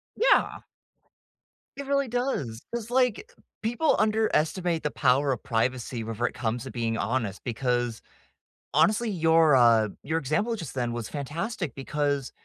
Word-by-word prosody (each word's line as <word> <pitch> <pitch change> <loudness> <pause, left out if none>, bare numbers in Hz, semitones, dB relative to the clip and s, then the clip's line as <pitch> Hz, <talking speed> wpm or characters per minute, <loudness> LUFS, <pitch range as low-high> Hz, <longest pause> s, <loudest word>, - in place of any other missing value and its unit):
Yeah. - - +3 1.2
It 280 - -5
really 280 0 +1
does, 235 - -2
'cause, 235 -1 -4
like, 250 - +1 0.3
people 240 +8 +1
underestimate 185 -6 +1
the 150 - -1
power 135 +1 +2
of 130 - -3
privacy 120 0 -1
whenever 115 +2 -3
it - - -6
comes 115 0 -2
to 130 - -7
being 115 -2 -2
honest 110 -2 -2
because 120 -1 -1 0.7
honestly, 210 - +3
your, 160 -4 +4
uh 115 -4 +5
your 160 +3 -1
example 165 - 0
just 165 -10 -7
then 120 -2 -2
was 120 -2 -4
fantastic 155 - -4
because 140 0 -2
145 Hz, 140 wpm, -27 LUFS, -, 1.2 s, uh